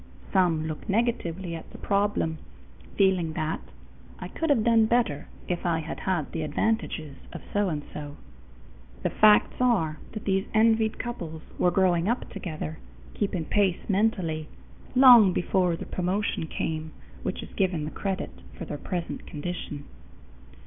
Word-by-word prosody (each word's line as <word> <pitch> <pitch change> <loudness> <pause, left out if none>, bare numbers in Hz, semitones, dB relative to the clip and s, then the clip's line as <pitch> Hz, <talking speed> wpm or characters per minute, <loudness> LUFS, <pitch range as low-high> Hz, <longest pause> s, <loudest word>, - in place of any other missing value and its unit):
Some 165 -4 +3
look 155 +6 -6
negatively 190 -6 0
at 165 - -7
the - - -11
problem, 200 -6 0 0.6
feeling 185 -5 +3
that 155 0 -2 0.6
"I - - -7
could 325 - -2
have 240 -7 +4
done 225 -1 +5
better 230 -12 +1 0.2
if 175 -1 -2
I 170 -2 +1
had 160 - -6
had 175 -6 -1
the 165 - -3
advantages 155 -2 -1
of - - -8
so 205 -2 +2
and 150 -3 -3
so." 145 -1 -6 0.9
The - - +1
facts 215 -1 +5
are 165 -12 +2
that 215 - -6
these 195 -1 +1
envied 220 0 +3
couples 170 -10 -5 0.2
were 180 - +4
growing 180 0 +2
up 240 - -1
together, 160 -2 -5 0.3
keeping 190 -5 -1
pace 195 -2 +1
mentally, 185 -7 0 0.5
long 245 -7 +9
before 180 -1 +1
the - - -7
promotion 185 -2 -1
came 160 0 -3 0.3
which - - -3
is - - -12
given 180 -6 0
the 155 - -5
credit 195 -1 -3 0.3
for - - -5
their 145 - -5
present 175 -3 -4
condition. 150 -2 -5
180 Hz, 150 wpm, -27 LUFS, 160-210 Hz, 0.9 s, long